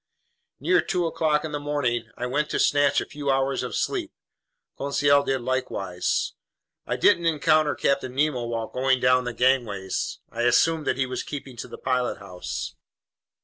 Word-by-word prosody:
Near 175 Hz, +6 st, +3 dB
two 180 Hz, -2 st, -1 dB
o'clock 155 Hz, -2 st, +1 dB
in 155 Hz, -, -5 dB
the 145 Hz, -, -2 dB
morning, 130 Hz, -6 st, -1 dB
I 125 Hz, -, -3 dB
went 145 Hz, +4 st, -1 dB
to -, -, -1 dB
snatch 145 Hz, -1 st, +3 dB
a -, -, -4 dB
few 145 Hz, -1 st, -5 dB
hours 135 Hz, 0 st, +1 dB
of -, -, -4 dB
sleep. 355 Hz, -6 st, -1 dB, 0.6 s
Conseil 140 Hz, 0 st, +3 dB
did 135 Hz, -2 st, -1 dB
likewise. 120 Hz, -8 st, -1 dB, 0.5 s
I -, -, 0 dB
didn't 170 Hz, -1 st, +3 dB
encounter 155 Hz, -1 st, +3 dB
Captain 135 Hz, -2 st, 0 dB
Nemo 140 Hz, -4 st, +1 dB
while 115 Hz, -1 st, -3 dB
going 130 Hz, 0 st, +1 dB
down 125 Hz, 0 st, +3 dB
the 120 Hz, -, -2 dB
gangways. 115 Hz, -7 st, 0 dB
I 115 Hz, -, -3 dB
assumed 150 Hz, +6 st, +3 dB
that -, -, +1 dB
he 135 Hz, -, +1 dB
was 130 Hz, 0 st, -3 dB
keeping 135 Hz, -3 st, -7 dB
to -, -, -6 dB
the -, -, -9 dB
pilothouse. 115 Hz, -8 st, -3 dB
135 Hz, 165 wpm, -25 LUFS, 125-150 Hz, 0.6 s, Near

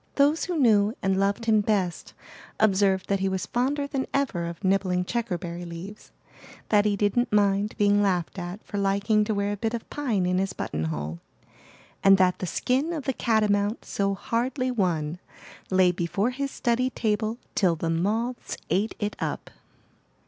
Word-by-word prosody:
Those 290 Hz, +3 st, +3 dB
who 355 Hz, -2 st, -2 dB
knew 220 Hz, -5 st, +4 dB
and 190 Hz, 0 st, +2 dB
loved 200 Hz, +4 st, 0 dB
him 215 Hz, -2 st, +4 dB
best 195 Hz, -5 st, -1 dB, 0.4 s
observed 195 Hz, -2 st, +3 dB
that 200 Hz, -1 st, +1 dB
he 195 Hz, 0 st, 0 dB
was 190 Hz, -2 st, -2 dB
fonder 275 Hz, +4 st, 0 dB
than 275 Hz, -2 st, -3 dB
ever 255 Hz, -12 st, 0 dB
of 170 Hz, +3 st, -8 dB
nibbling 185 Hz, -1 st, +1 dB
checkerberry 175 Hz, -7 st, -3 dB
leaves, 175 Hz, +5 st, -9 dB, 0.6 s
that 210 Hz, -1 st, +4 dB
he 210 Hz, -1 st, +2 dB
didn't 205 Hz, +5 st, +1 dB
mind 205 Hz, 0 st, +2 dB
being 205 Hz, -1 st, +4 dB
laughed 185 Hz, -2 st, 0 dB
at 175 Hz, +4 st, -6 dB
for 205 Hz, -, -4 dB
liking 200 Hz, +2 st, +2 dB
to 215 Hz, 0 st, -1 dB
wear 200 Hz, 0 st, 0 dB
a 205 Hz, -, -3 dB
bit 225 Hz, +3 st, -1 dB
of 230 Hz, -, -7 dB
pine 230 Hz, -11 st, 0 dB
in 180 Hz, +1 st, +1 dB
his 195 Hz, 0 st, -1 dB
buttonhole, 80 Hz, +1 st, -3 dB, 0.8 s
and 195 Hz, 0 st, +7 dB
that 185 Hz, -1 st, +3 dB
the 185 Hz, -, -3 dB
skin 270 Hz, -, 0 dB
of 310 Hz, -4 st, -4 dB
the 265 Hz, -, -1 dB
catamount 210 Hz, -2 st, +1 dB
so 195 Hz, 0 st, -1 dB
hardly 255 Hz, +5 st, -1 dB
won 175 Hz, -7 st, -1 dB, 0.5 s
lay 185 Hz, -1 st, +4 dB
before 180 Hz, +6 st, -1 dB
his 275 Hz, +2 st, -3 dB
study 250 Hz, 0 st, 0 dB
table 220 Hz, -1 st, -1 dB, 0.2 s
till 180 Hz, -5 st, +2 dB
the 165 Hz, +1 st, -2 dB
moths 220 Hz, +9 st, -1 dB
ate 205 Hz, +4 st, +1 dB
it 210 Hz, -1 st, -3 dB
up. -, -, -4 dB
205 Hz, 170 wpm, -26 LUFS, 185-230 Hz, 0.8 s, and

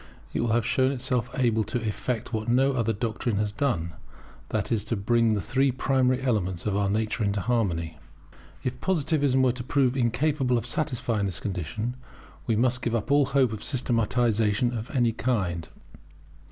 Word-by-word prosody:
It -, -, 0 dB
will 120 Hz, -, 0 dB
have 115 Hz, -1 st, +2 dB
shown 130 Hz, 0 st, +2 dB
itself 125 Hz, -2 st, -1 dB
able 115 Hz, -4 st, +2 dB
to 115 Hz, -3 st, -3 dB
effect 115 Hz, +3 st, -3 dB
what 110 Hz, 0 st, -2 dB
no 135 Hz, +3 st, +3 dB
other 115 Hz, -3 st, +1 dB
doctrine 110 Hz, 0 st, -2 dB
has 105 Hz, 0 st, 0 dB
done, 100 Hz, -9 st, -1 dB, 0.6 s
that -, -, -2 dB
is, 110 Hz, -3 st, +1 dB
to 115 Hz, -, -1 dB
bring 115 Hz, +2 st, +2 dB
the 100 Hz, -, -1 dB
three 135 Hz, +6 st, +1 dB
primary 130 Hz, 0 st, +1 dB
elements 95 Hz, -8 st, -1 dB
of 105 Hz, -2 st, 0 dB
our 100 Hz, -1 st, +1 dB
nature 110 Hz, +3 st, 0 dB
into 100 Hz, 0 st, 0 dB
harmony. 85 Hz, -9 st, -1 dB, 0.6 s
If 125 Hz, 0 st, -3 dB
Positivism 145 Hz, -6 st, +2 dB
were 130 Hz, -, +4 dB
to 125 Hz, 0 st, -6 dB
prove 130 Hz, 0 st, +1 dB
incapable 130 Hz, +1 st, +1 dB
of 115 Hz, -, -3 dB
satisfying 120 Hz, -6 st, -1 dB
this 90 Hz, -3 st, -4 dB
condition, 105 Hz, +5 st, -3 dB, 0.5 s
we 115 Hz, -, +2 dB
must 125 Hz, +2 st, +1 dB
give 120 Hz, -1 st, -1 dB
up 115 Hz, +4 st, -2 dB
all 145 Hz, -1 st, +4 dB
hope 130 Hz, -5 st, +2 dB
of 110 Hz, -, -6 dB
systematization 120 Hz, -2 st, +1 dB
of 110 Hz, +1 st, -5 dB
any 120 Hz, -5 st, +2 dB
kind. 95 Hz, -9 st, -1 dB
120 Hz, 175 wpm, -26 LUFS, 105-130 Hz, 0.6 s, were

